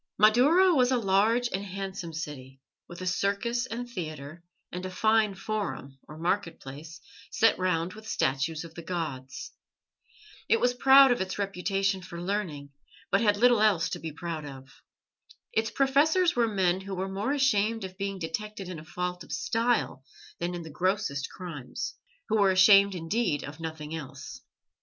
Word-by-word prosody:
Madaura 285 - +5
was 250 -5 +4
a 260 - +2
large 220 +3 +2
and 195 +1 -2
handsome 195 -2 -5
city, 135 -4 -7 0.3
with 175 +1 -10
a - - -4
circus 200 +7 0
and 245 +1 -5
theatre, 155 -6 -7 0.3
and 180 +1 -5
a 185 - -4
fine 215 +1 +2
forum, 195 -9 -4
or 155 - -10
market 175 +2 -1
place, 150 +4 -10 0.3
set 225 - +3
round 180 -1 0
with 220 0 -12
statues 140 +5 0
of 165 -1 -11
the 170 - -8
gods. 155 -7 -5 1.0
It 455 - +4
was 245 - +2
proud 270 +1 +7
of 240 - +1
its 190 0 -3
reputation 195 0 -1
for 170 -2 -8
learning, 175 -7 -3 0.4
but 200 - +3
had 205 -2 +3
little 240 0 +5
else 200 -6 +3
to - - -4
be 160 - -5
proud 165 0 -5
of. 135 -2 -10 0.8
Its 225 0 +1
professors 300 +8 +3
were 235 -1 +3
men 190 -3 +1
who 195 0 -6
were 190 +1 -2
more 195 +7 -2
ashamed 225 -6 +1
of 185 -1 -7
being 195 0 -3
detected 195 +3 -5
in 175 -4 -6
a - - -11
fault 180 +2 -4
of - - -13
style 225 - 0 0.4
than 175 +1 -2
in 175 - -6
the 160 - -9
grossest 175 -4 -1
crimes, 175 - -6 0.3
who 220 - +1
were 195 - +5
ashamed 195 +1 +6
indeed 165 -2 -1
of 145 +2 -8
nothing 160 -1 -6
else. 155 -5 -8
190 Hz, 170 wpm, -28 LUFS, 165-220 Hz, 1.0 s, proud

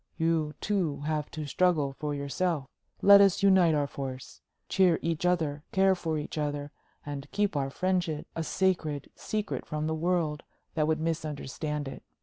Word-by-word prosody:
You, 160 -2 +1
too, 180 -9 0
have 150 0 -2
to 155 -2 -5
struggle 150 -2 +2
for 150 +1 -3
yourself. 140 +2 -1 0.4
Let 200 0 +9
us 200 0 +4
unite 185 -5 +5
our 145 -1 +2
forces 135 -2 -7 0.3
cheer 185 -4 +4
each 165 +1 0
other, 155 -5 0
care 190 0 +4
for 165 -4 -2
each 150 +1 -4
other 145 -1 -2 0.3
and 145 -1 -6
keep 205 -3 0
our 135 -1 0
friendship 175 -1 -1
a 165 - -1
sacred 160 -5 0
secret 215 -1 -3
from 155 0 -3
the 160 - 0
world 160 -2 0 0.3
that 155 -2 +1
would 155 0 +1
misunderstand 150 -2 -3
it. - - -7
155 Hz, 160 wpm, -29 LUFS, 145-180 Hz, 0.4 s, Let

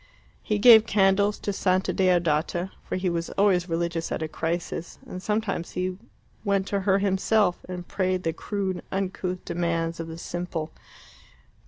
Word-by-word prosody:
He 210 - -1
gave 220 0 +8
candles 200 0 +3
to 205 - -3
Santa 185 -1 +1
Deodata, 175 -1 +1
for - - -4
he 185 0 -1
was 170 -1 -1
always 190 -3 +3
religious 165 0 -2
at - - -2
a - - -2
crisis, 165 +1 -3
and 185 - -7
sometimes 210 -4 -2
he 185 +1 -2 0.4
went 200 -2 +1
to 200 - 0
her 195 0 +3
himself 195 0 +2
and 180 -1 -6
prayed 185 -1 -1
the 165 - 0
crude 190 0 -3
uncouth 185 -1 -3
demands 170 -1 -1
of 165 - -4
the 165 0 -7
simple. 170 -2 -4
185 Hz, 155 wpm, -26 LUFS, 170-195 Hz, 0.4 s, gave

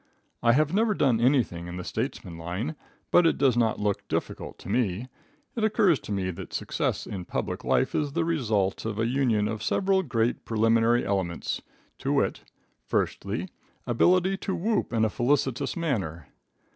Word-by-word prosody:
I 120 0 +5
have 150 +4 +2
never 215 +1 +2
done 125 -8 +2
anything 120 -10 +2
in 85 +1 -6
the 90 - -5
statesman 110 - -4
line, 90 - -4 0.4
but 175 -1 +6
it - - +2
does 135 -4 +3
not 115 -2 +2
look 105 -1 -1
difficult - - -3
to - - -12
me. 115 0 0 0.5
It 230 - -1
occurs 210 - +3
to - - -9
me 95 -2 -1
that 85 - -9
success - - -1
in 95 -3 -5
public - - -3
life - - +2
is 145 -2 -1
the 170 +1 +1
result 110 - 0
of 110 -2 -3
a 115 - +1
union 120 -4 +2
of 110 -1 -4
several 190 +9 +2
great 120 -7 0
primary 115 +2 +3
elements, 95 -4 -2 0.4
to - - -1
wit: - - +1 0.4
Firstly - - -2 0.4
Ability 185 +10 +3
to 190 0 -3
whoop 210 +3 0
in 110 -2 +2
a - - +1
felicitous 135 - 0
manner. 95 - -2
120 Hz, 170 wpm, -27 LUFS, 105-155 Hz, 0.5 s, but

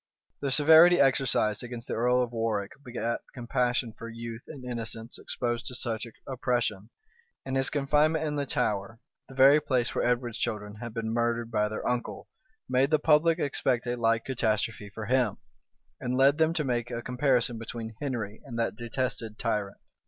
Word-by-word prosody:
The 140 - -2
severity 160 +5 +7
exercised 130 -6 +3
against 120 -1 -7
the - - -3
earl 125 +2 +2
of 120 - -5
Warwick 110 -4 -1
begat 120 -2 -2 0.2
compassion 125 -1 0
for 115 +1 -8
youth 115 0 -7
and 135 -5 -9
innocence 115 -1 -5
exposed 120 -1 -2
to 125 - -5
such 115 -2 -3 0.2
oppression; 120 -5 -1 0.6
and 135 0 -3
his 135 0 +2
confinement 150 +3 +2
in 150 -1 -2
the 140 -1 -2
Tower, 105 +1 -1 0.3
the 135 - -11
very 140 +3 +7
place 125 -5 +1
where - - 0
Edward's 120 -1 0
children 105 -3 -3
had 120 0 -7
been 115 -1 -2
murdered 120 0 0
by 105 -1 +1
their 110 - -4
uncle, 125 -1 -3 0.4
made 130 +2 +2
the 155 - +4
public 160 +2 +4
expect 130 -5 0
a 120 0 -1
like 115 -1 +1
catastrophe 110 -4 -1
for 110 +1 -7
him, 120 -3 +1 0.6
and 125 -2 -2
led 140 +3 +5
them 160 0 +4
to 155 - +1
make 120 -3 -1
a 120 -1 -4
comparison 125 -2 +1
between 115 0 -6
Henry 115 -7 -4
and 120 -5 -7
that 115 - -1
detested 120 -2 -3
tyrant. 105 -4 -2
120 Hz, 175 wpm, -28 LUFS, 115-135 Hz, 0.6 s, severity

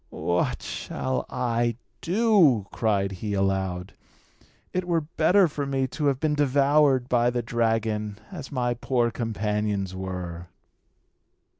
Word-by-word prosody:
"What 85 0 -1
shall 130 -1 -3
I 120 -2 0 0.3
do?" 180 - +4
cried 100 -3 0
he 100 +2 -4
aloud. 95 -1 -1 0.8
"It 185 0 -1
were 170 -2 +2
better 175 +5 +3
for 145 -2 -4
me 135 -1 0
to 150 +3 -1
have 135 -2 +1
been 155 0 +1
devoured 140 -2 +3
by 120 -1 +3
the 120 0 -2
dragon, 110 -3 -1
as 155 -8 -8
my 125 -3 0
poor 120 0 0
companions 105 -4 -2
were." 90 -2 -5
120 Hz, 125 wpm, -26 LUFS, 105-140 Hz, 0.8 s, do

